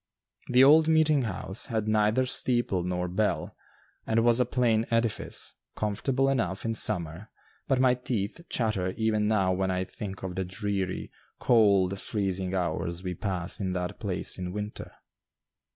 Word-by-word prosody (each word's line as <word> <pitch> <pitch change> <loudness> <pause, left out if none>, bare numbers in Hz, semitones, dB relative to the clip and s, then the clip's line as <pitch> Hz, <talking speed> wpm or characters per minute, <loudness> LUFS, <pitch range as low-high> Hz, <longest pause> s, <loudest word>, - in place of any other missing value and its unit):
The 125 +1 +5
old 155 +3 +7
meeting 155 -2 +4
house 110 -2 -4
had 110 -4 -2
neither 110 +4 +2
steeple 120 -7 0
nor 90 0 -2
bell 100 +4 -1 0.5
and 115 +1 +2
was 120 0 +4
a 125 - +3
plain 115 -3 +1
edifice, 115 -2 0 0.2
comfortable 125 +6 0
enough 105 -8 -1
in 115 - 0
summer, 90 -3 -2 0.4
but 135 -2 +2
my 130 -1 +5
teeth 120 +1 -3
chatter 100 -6 0
even 110 -2 +1
now 95 -4 +2
when 95 +1 -1
I 95 0 0
think 95 0 -8
of 95 -1 -4
the 95 - -2
dreary, 95 0 -3 0.3
cold, 100 -5 +3
freezing 95 -3 -2
hours 85 0 -2
we 90 -1 -3
passed 90 0 -2
in 95 -1 -1
that 90 -1 -4
place 95 -2 -1
in 90 -1 -4
winter. 105 +2 -6
105 Hz, 150 wpm, -28 LUFS, 95-115 Hz, 0.5 s, old